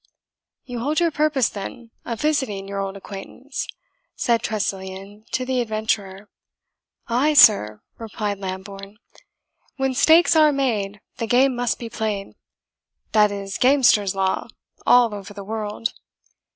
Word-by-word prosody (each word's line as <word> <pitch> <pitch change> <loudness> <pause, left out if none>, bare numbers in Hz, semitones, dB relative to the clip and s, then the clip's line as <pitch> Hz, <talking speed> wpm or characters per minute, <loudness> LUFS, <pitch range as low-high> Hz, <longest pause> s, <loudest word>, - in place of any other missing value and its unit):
"You 245 -3 -6
hold 295 +7 0
your 340 -1 +2
purpose, 295 -4 +2
then, 230 +3 -8
of 230 -2 -4
visiting 265 -11 -1
your 200 0 -4
old 195 0 -4
acquaintance?" 210 +8 -7 0.5
said 235 -2 +1
Tressilian 195 0 -4
to 255 - -1
the 255 -1 0
adventurer. 215 -3 -2 0.8
"Ay, 270 +6 +2
sir," 105 - +6 0.2
replied 210 -2 -4
Lambourne; 195 +1 -7 0.8
"when 265 -1 0
stakes 325 +6 +5
are 310 -1 +6
made, 210 -8 -1 0.2
the 230 - -3
game 255 +2 +3
must 245 -1 -1
be 235 - -6
played; 215 -3 -4 0.8
that 210 -1 +4
is 200 -1 -5
gamester's 245 -7 +4
law, 190 -1 -1 0.4
all 245 -3 +5
over 205 0 -8
the 200 - -7
world. 215 +1 -4
220 Hz, 130 wpm, -22 LUFS, 200-255 Hz, 0.8 s, sir